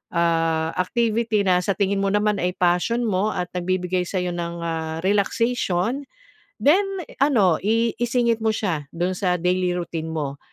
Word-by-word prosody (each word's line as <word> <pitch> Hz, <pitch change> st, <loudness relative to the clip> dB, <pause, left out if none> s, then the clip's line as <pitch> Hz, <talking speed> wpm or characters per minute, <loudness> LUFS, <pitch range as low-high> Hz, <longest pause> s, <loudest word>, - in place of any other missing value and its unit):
ah, 165 Hz, -1 st, +1 dB
activity 225 Hz, +2 st, +1 dB
na 180 Hz, -1 st, +4 dB
sa 200 Hz, -, +1 dB
tingin 200 Hz, -1 st, 0 dB
mo 195 Hz, -, +1 dB
naman 210 Hz, 0 st, +2 dB
ay 180 Hz, 0 st, 0 dB
passion 180 Hz, +7 st, +1 dB
mo 200 Hz, -1 st, +1 dB
at 180 Hz, -1 st, -3 dB
nagbibigay 180 Hz, 0 st, 0 dB
sa'yo 180 Hz, -2 st, -2 dB
ng, 170 Hz, 0 st, -4 dB
ah, 160 Hz, -1 st, -3 dB
relaxation 225 Hz, +3 st, 0 dB, 0.6 s
then 345 Hz, +8 st, +5 dB, 0.3 s
i -, -, -13 dB
ano, 210 Hz, -, +4 dB
i 230 Hz, +1 st, +2 dB
isingit 235 Hz, -1 st, +1 dB
mo 220 Hz, 0 st, +2 dB
siya 165 Hz, -10 st, -2 dB
do'n 175 Hz, +2 st, 0 dB
sa 180 Hz, -1 st, +1 dB
daily 180 Hz, 0 st, +1 dB
routine 170 Hz, -2 st, -4 dB
mo, 145 Hz, -3 st, -3 dB
185 Hz, 160 wpm, -23 LUFS, 175-220 Hz, 0.6 s, then